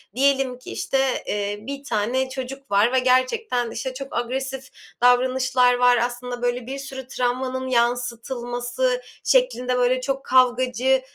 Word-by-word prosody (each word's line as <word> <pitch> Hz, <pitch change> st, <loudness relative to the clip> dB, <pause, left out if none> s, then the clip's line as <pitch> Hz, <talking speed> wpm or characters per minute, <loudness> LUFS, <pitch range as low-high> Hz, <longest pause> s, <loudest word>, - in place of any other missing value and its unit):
diyelim 270 Hz, -1 st, +2 dB
ki -, -, -10 dB
işte, 270 Hz, -1 st, 0 dB
eee, 205 Hz, 0 st, -2 dB
bir 275 Hz, +4 st, -7 dB
tane 245 Hz, +3 st, -1 dB
çocuk 270 Hz, 0 st, -7 dB
var 210 Hz, +5 st, +3 dB
ve 260 Hz, -, +4 dB
gerçekten, 255 Hz, -, +1 dB
işte, 260 Hz, +2 st, -4 dB
çok 275 Hz, +1 st, -7 dB
agresif 265 Hz, +2 st, -3 dB, 0.3 s
davranışlar 250 Hz, 0 st, +4 dB
var, 245 Hz, 0 st, +4 dB
aslında 245 Hz, +1 st, -3 dB
böyle 245 Hz, 0 st, -1 dB
bir 270 Hz, +1 st, -5 dB
sürü 265 Hz, -2 st, -8 dB
travmanın 255 Hz, +1 st, -2 dB
yansıtılması 245 Hz, -, -1 dB, 0.2 s
şeklinde, 375 Hz, -, +2 dB
böyle, 250 Hz, +1 st, +2 dB
çok 270 Hz, +1 st, -3 dB
kavgacı 255 Hz, 0 st, +3 dB
255 Hz, 135 wpm, -23 LUFS, 245-265 Hz, 0.3 s, ve